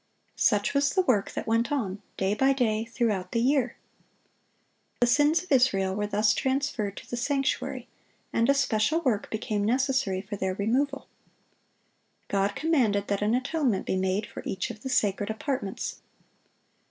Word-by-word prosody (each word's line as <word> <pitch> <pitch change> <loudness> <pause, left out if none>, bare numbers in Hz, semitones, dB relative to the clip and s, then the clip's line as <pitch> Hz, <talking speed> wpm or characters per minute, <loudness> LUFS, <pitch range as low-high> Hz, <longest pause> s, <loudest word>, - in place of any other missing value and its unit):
Such 205 +1 +2
was 280 0 +2
the 375 - +4
work 215 - +2
that - - -4
went 230 +2 +1
on, 210 -8 -2 0.2
day 190 +1 +1
by 270 +5 +3
day, 225 -4 0
throughout 220 -6 -1
the 230 - +2
year. 255 0 +2 1.2
The 245 - +4
sins 295 +7 +3
of 365 - -17
Israel 200 -8 +3
were 210 +1 -2
thus 210 +1 +2
transferred 260 -7 -1
to - - -9
the - - -4
sanctuary, 275 +2 -1 0.5
and 230 +2 +2
a 280 - +5
special 275 +4 +1
work 235 -9 0
became 215 -1 -2
necessary 255 -4 +1
for 205 0 -6
their 190 -1 -1
removal. 265 +8 0 1.2
God 200 0 0
commanded 240 -11 +1
that 200 0 0
an 215 +3 +2
atonement 255 -5 0
be - - -1
made 190 +2 0
for - - -9
each 190 - -3
of 215 - -12
the 265 - -5
sacred 205 -4 +1
apartments. 220 -2 -3
230 Hz, 160 wpm, -27 LUFS, 205-270 Hz, 1.2 s, a